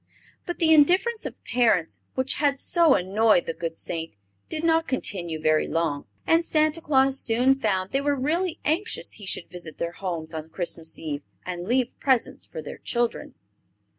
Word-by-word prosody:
But 350 Hz, -, -3 dB
the 320 Hz, -1 st, +4 dB
indifference 370 Hz, +10 st, +4 dB
of -, -, -11 dB
parents, 225 Hz, -9 st, +1 dB, 0.2 s
which 260 Hz, +1 st, 0 dB
had 285 Hz, -2 st, +2 dB
so 330 Hz, 0 st, +4 dB
annoyed 200 Hz, +1 st, +3 dB
the 165 Hz, -, -3 dB
good 165 Hz, -1 st, -5 dB
Saint, 165 Hz, -6 st, -5 dB, 0.3 s
did 315 Hz, 0 st, -3 dB
not 325 Hz, 0 st, +3 dB
continue 175 Hz, -10 st, -1 dB
very 155 Hz, 0 st, +2 dB
long, 165 Hz, -4 st, -1 dB, 0.2 s
and 330 Hz, +1 st, +4 dB
Santa 310 Hz, 0 st, +1 dB
Claus 270 Hz, -2 st, +3 dB
soon 245 Hz, +4 st, +3 dB
found 195 Hz, -8 st, -1 dB
they 275 Hz, -, +1 dB
were 285 Hz, 0 st, +1 dB
really 330 Hz, +6 st, -1 dB
anxious 355 Hz, +9 st, -1 dB
he 205 Hz, -, -9 dB
should 180 Hz, -, -2 dB
visit 175 Hz, -3 st, -7 dB
their 170 Hz, -, -2 dB
homes 170 Hz, -3 st, -5 dB
on 160 Hz, 0 st, -6 dB
Christmas 165 Hz, -2 st, -2 dB
Eve 150 Hz, -2 st, -4 dB, 0.2 s
and 180 Hz, 0 st, -5 dB
leave 250 Hz, +1 st, 0 dB
presents 260 Hz, -4 st, +1 dB
for 475 Hz, -, -7 dB
their -, -, -8 dB
children. 240 Hz, -1 st, -2 dB
240 Hz, 170 wpm, -25 LUFS, -, 0.3 s, the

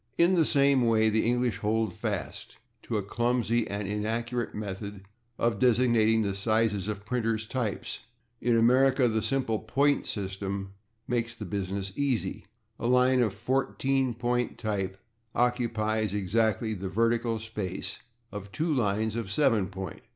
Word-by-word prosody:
In 170 Hz, +2 st, +5 dB
the 165 Hz, -4 st, +3 dB
same 140 Hz, -3 st, +4 dB
way 110 Hz, -1 st, +4 dB
the 110 Hz, +1 st, +2 dB
English 120 Hz, -1 st, +1 dB
hold 110 Hz, -2 st, 0 dB
fast -, -, -4 dB, 0.2 s
to 110 Hz, -, -2 dB
a 105 Hz, -, -1 dB
clumsy 120 Hz, +1 st, 0 dB
and 100 Hz, 0 st, -3 dB
inaccurate 115 Hz, +3 st, -2 dB
method 100 Hz, -1 st, -6 dB, 0.3 s
of 115 Hz, -3 st, 0 dB
designating 115 Hz, -3 st, +4 dB
the 100 Hz, -1 st, -1 dB
sizes 105 Hz, -1 st, +1 dB
of 105 Hz, -1 st, -4 dB
printers' 115 Hz, -2 st, -1 dB
types. 115 Hz, -3 st, -3 dB, 0.4 s
In 120 Hz, 0 st, +2 dB
America 130 Hz, +3 st, +4 dB
the 110 Hz, -1 st, 0 dB
simple 115 Hz, -1 st, 0 dB
point 140 Hz, +6 st, +1 dB
system 95 Hz, -1 st, -4 dB, 0.3 s
makes 115 Hz, -1 st, -1 dB
the 110 Hz, -, -7 dB
business 95 Hz, 0 st, -3 dB
easy; 125 Hz, -11 st, -1 dB, 0.3 s
a 115 Hz, -, -1 dB
line 125 Hz, +1 st, +4 dB
of 110 Hz, -5 st, +1 dB
/14 135 Hz, -1 st, 0 dB
point/ 120 Hz, 0 st, -1 dB
type 100 Hz, -4 st, -2 dB, 0.4 s
occupies 110 Hz, -4 st, 0 dB
exactly 110 Hz, +2 st, +1 dB
the 95 Hz, -2 st, -4 dB
vertical 115 Hz, +2 st, +1 dB
space 105 Hz, -4 st, -4 dB, 0.3 s
of 100 Hz, 0 st, -7 dB
two 155 Hz, +6 st, 0 dB
lines 110 Hz, -3 st, 0 dB
of 115 Hz, -3 st, -3 dB
/7 105 Hz, -3 st, +2 dB
point 95 Hz, -2 st, -7 dB
110 Hz, 145 wpm, -28 LUFS, 105-120 Hz, 0.4 s, In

